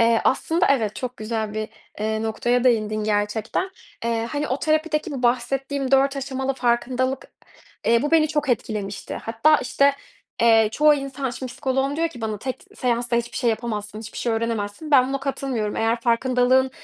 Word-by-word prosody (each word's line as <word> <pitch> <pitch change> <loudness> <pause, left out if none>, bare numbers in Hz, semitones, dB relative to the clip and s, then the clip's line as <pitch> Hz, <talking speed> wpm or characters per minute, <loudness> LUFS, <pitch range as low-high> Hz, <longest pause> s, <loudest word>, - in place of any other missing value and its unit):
Eee, 230 0 +4
aslında 330 +7 +2
evet, 225 -7 +1
çok 250 -1 -5
güzel 220 -1 -3
bir, 215 0 -3 0.3
eee, 220 +1 -1
noktaya 240 +3 0
değindin 215 -3 +2
gerçekten. 215 - -1 0.3
Eee, 230 0 -1
hani, 295 0 -2
o 260 - -1
terapideki 310 +1 0
bu 270 -3 -5
bahsettiğim 265 +3 0
4 275 +1 +4
aşamalı 270 0 -2
farkındalık, 255 +2 0 0.5
eee, 230 0 +4
bu 295 - -1
beni 320 -1 +4
çok 295 -1 -1
etkilemişti. 210 -4 -2
Hatta, 230 +8 +3
işte, 280 +1 +2 0.5
eee, 225 -2 +6
çoğu 300 +4 +5
insan, 275 -1 -3
şimdi 250 +1 -6
psikoloğum 270 +1 -1
diyor 330 +1 +1
ki 255 -7 -12
bana, 215 -2 -3
"Tek 255 +4 -5
seansta 240 -1 0
hiçbir 235 0 -2
şey 240 -2 +2
yapamazsın, 215 -2 -4
hiçbir 225 0 -8
şey 235 - 0
öğrenemezsin." 225 +5 -3
Ben 260 -2 +6
buna 275 0 -2
katılmıyorum. 265 -6 -2
Eğer 225 +1 +1
farkındalığın 255 +2 +3
245 Hz, 170 wpm, -23 LUFS, 225-275 Hz, 0.5 s, eee